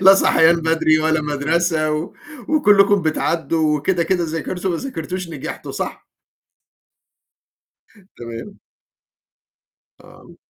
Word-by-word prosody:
لا 195 Hz, +1 st, +8 dB
صحيان 165 Hz, -3 st, +4 dB
بدري 160 Hz, -1 st, +2 dB
ولا 160 Hz, 0 st, +1 dB
مَدرسة 155 Hz, +2 st, 0 dB
و 155 Hz, +3 st, -3 dB, 0.4 s
وكلّكم 205 Hz, -, +4 dB
بتعدّوا 160 Hz, -1 st, 0 dB
وكده، 175 Hz, +4 st, 0 dB
كده 175 Hz, +1 st, 0 dB
ذاكرتوا 175 Hz, +4 st, -3 dB
ما 170 Hz, -, -1 dB
ذاكرتوش 180 Hz, -, -5 dB
نجحتوا -, -, -7 dB
صح؟ -, -, -5 dB, 2.1 s
تمام. 115 Hz, -1 st, -9 dB, 1.4 s
آه. -, -, -17 dB
165 Hz, 95 wpm, -19 LUFS, 155-185 Hz, 2.1 s, لا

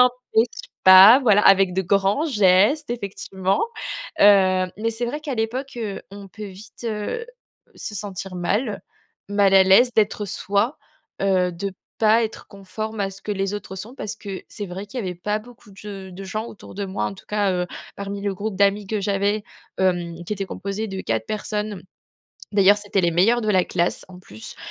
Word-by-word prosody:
empêche 250 Hz, -2 st, +2 dB, 0.2 s
pas, 190 Hz, +6 st, +10 dB
voilà, 210 Hz, -5 st, +4 dB
avec 195 Hz, -1 st, +5 dB
de 190 Hz, -, +1 dB
grands 200 Hz, -, +2 dB
gestes, 210 Hz, -, +3 dB
effectivement. 195 Hz, -3 st, -2 dB, 0.6 s
Heu, 185 Hz, -2 st, +5 dB
mais 225 Hz, +3 st, -1 dB
c'est 230 Hz, +2 st, -3 dB
vrai 295 Hz, +5 st, -4 dB
qu'à 290 Hz, -4 st, -4 dB
l'époque, 245 Hz, +5 st, -3 dB
heu, 215 Hz, -4 st, -4 dB
on 200 Hz, 0 st, -10 dB
peut 215 Hz, +2 st, -8 dB
vite, 200 Hz, +4 st, -12 dB
heu, 225 Hz, -, -3 dB, 0.5 s
se 210 Hz, -, -7 dB
sentir 195 Hz, -2 st, -6 dB
mal. 205 Hz, +6 st, -1 dB, 0.5 s
Mal 200 Hz, -1 st, +3 dB
à 190 Hz, -, +8 dB
l'aise 195 Hz, +7 st, +6 dB
d'être 210 Hz, -1 st, +1 dB
soi. 200 Hz, +6 st, -1 dB, 0.4 s
Heu, 185 Hz, -2 st, +2 dB
de 195 Hz, +3 st, -4 dB, 0.3 s
pas 220 Hz, +1 st, +4 dB
être 220 Hz, -, -7 dB
conforme 215 Hz, +2 st, -6 dB
à 195 Hz, -1 st, -1 dB
ce 195 Hz, 0 st, -14 dB
que 210 Hz, -, -3 dB
les 195 Hz, 0 st, -2 dB
autres 205 Hz, -2 st, -7 dB
sont, 215 Hz, +7 st, -8 dB
parce 215 Hz, -5 st, -6 dB
que 200 Hz, -3 st, -7 dB
c'est 205 Hz, -3 st, -6 dB
vrai 190 Hz, +3 st, -7 dB
qu'il 245 Hz, +5 st, -7 dB
y -, -, -4 dB
avait 180 Hz, -2 st, -4 dB
pas 210 Hz, +5 st, -2 dB
beaucoup 230 Hz, -1 st, -16 dB
de 195 Hz, -, -18 dB
ge 195 Hz, -1 st, -8 dB
de 195 Hz, +2 st, -8 dB
gens 215 Hz, +4 st, -4 dB
autour 210 Hz, -, -12 dB
de 200 Hz, 0 st, -3 dB
moi, 190 Hz, +1 st, -3 dB
en -, -, -3 dB
tout 190 Hz, -, -16 dB
cas, 205 Hz, -2 st, +1 dB
heu, 180 Hz, 0 st, -1 dB, 0.3 s
parmi 200 Hz, 0 st, -5 dB
le 200 Hz, -1 st, -1 dB
groupe 205 Hz, 0 st, -4 dB
d'amis 200 Hz, +1 st, +2 dB
que 215 Hz, +1 st, -2 dB
j'avais, 200 Hz, +1 st, 0 dB, 0.3 s
hem, 175 Hz, -2 st, 0 dB
qui 195 Hz, -, -4 dB
était 195 Hz, -2 st, -3 dB
composé 200 Hz, +4 st, -4 dB
de 190 Hz, -1 st, -5 dB
4 110 Hz, -1 st, -2 dB
personnes, 210 Hz, -1 st, -3 dB
mmh. 180 Hz, -, -11 dB, 0.7 s
D'ailleurs, 200 Hz, 0 st, +6 dB
c'étaient 205 Hz, -1 st, 0 dB
les 170 Hz, -2 st, +1 dB
meilleurs 225 Hz, +8 st, +3 dB
de 215 Hz, -, -2 dB
la 185 Hz, -3 st, +3 dB
classe 170 Hz, +1 st, -1 dB
en 185 Hz, -1 st, -12 dB
plus. 110 Hz, -, -11 dB
200 Hz, 195 wpm, -22 LUFS, 190-215 Hz, 0.7 s, pas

